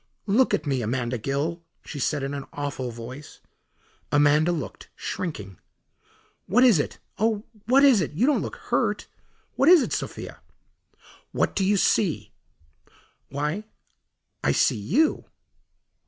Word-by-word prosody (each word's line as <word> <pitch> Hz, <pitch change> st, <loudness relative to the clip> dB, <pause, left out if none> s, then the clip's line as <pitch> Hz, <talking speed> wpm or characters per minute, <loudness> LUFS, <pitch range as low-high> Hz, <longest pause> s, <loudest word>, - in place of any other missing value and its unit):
"Look 220 Hz, +5 st, +3 dB
at 150 Hz, -, -5 dB
me, 135 Hz, -3 st, 0 dB
Amanda 120 Hz, +1 st, -2 dB
Gill," 145 Hz, +8 st, -2 dB, 0.2 s
she 145 Hz, -, -7 dB
said 145 Hz, +2 st, 0 dB
in 135 Hz, +1 st, -3 dB
an 140 Hz, -1 st, -5 dB
awful 140 Hz, -3 st, -4 dB
voice. 120 Hz, +5 st, -9 dB, 0.7 s
Amanda 145 Hz, +3 st, +4 dB
looked, 150 Hz, -, -5 dB
shrinking. 105 Hz, -, -5 dB, 0.9 s
"What 240 Hz, +7 st, +4 dB
is 235 Hz, -11 st, +6 dB
it? -, -, -2 dB, 0.2 s
Oh, 215 Hz, -1 st, +1 dB, 0.2 s
what 270 Hz, +3 st, +5 dB
is 260 Hz, -8 st, +6 dB
it? 155 Hz, -, -3 dB
You 185 Hz, +11 st, +2 dB
don't 295 Hz, 0 st, +2 dB
look -, -, -5 dB
hurt. -, -, -1 dB, 0.5 s
What 275 Hz, -, +5 dB
is 355 Hz, -4 st, +8 dB
it, -, -, -3 dB
Sophia?" -, -, -5 dB, 0.9 s
"What -, -, 0 dB
do 195 Hz, -, +1 dB
you 200 Hz, +2 st, +3 dB
see?" 190 Hz, -3 st, +1 dB, 1.0 s
"Why, 150 Hz, +8 st, -2 dB, 0.8 s
I -, -, +3 dB
see -, -, +3 dB
you." 245 Hz, -, +1 dB
150 Hz, 140 wpm, -25 LUFS, 135-210 Hz, 1.0 s, is